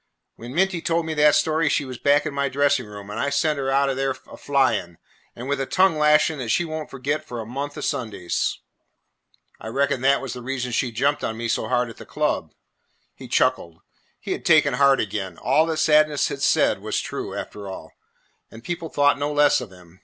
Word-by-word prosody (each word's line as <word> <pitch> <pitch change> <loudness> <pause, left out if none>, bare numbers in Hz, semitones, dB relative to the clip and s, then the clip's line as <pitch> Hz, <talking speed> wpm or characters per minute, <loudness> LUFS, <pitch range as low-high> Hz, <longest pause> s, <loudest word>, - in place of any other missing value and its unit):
When 120 +4 -9
Minty 185 -1 +1
told 170 -1 0
me 160 - -3
that 150 -1 +5
story, 160 -1 +2
she 145 - 0
was 130 -2 -8
back 145 +1 +3
in 150 - -3
my 140 0 0
dressing 140 -2 +1
room, 105 -1 -10
and - - -5
I 140 - 0
sent 145 +1 0
her 135 -1 -1
out 140 +1 +2
o' 135 - 0
there 135 0 -1
a - - -11
flying, 120 -12 0 0.4
and 120 +2 -7
with 140 -1 -1
a 135 - -3
tongue 185 -2 +3
lashing 150 0 +3
that 120 -3 -4
she 175 - +2
won't 155 -1 -5
forget 145 +3 -3
for 120 -6 -7
a 110 - -5
month 140 +5 -5
o' - - -5
Sundays." 110 -10 -2 1.0
"I - - -9
reckon 140 +2 0
that 135 +1 +3
was 135 -3 -5
the 125 - -8
reason 125 0 -3
she 120 +1 0
jumped 140 +6 0
on 110 - -3
me 115 0 -3
so 115 - -1
hard 125 -1 +1
at - - -15
the - - -11
club." - - -2 0.6
He - - -11
chuckled. 85 -1 0 0.4
He - - -6
had - - -3
taken 150 -3 +4
heart 140 +1 +4
again. 95 -4 -3
All 150 +6 +2
that 160 -1 -2
Sadness 155 -1 +3
had - - -6
said - - +3
was - - -2
true, - - -5
after 100 -1 -7
all, 95 - -9 0.6
and 115 +1 -13
people 170 0 -4
thought 145 -1 +2
no 145 +1 -1
less 145 -2 +4
of 115 -6 -8
him. 90 -1 -18
140 Hz, 220 wpm, -23 LUFS, 120-150 Hz, 1.0 s, that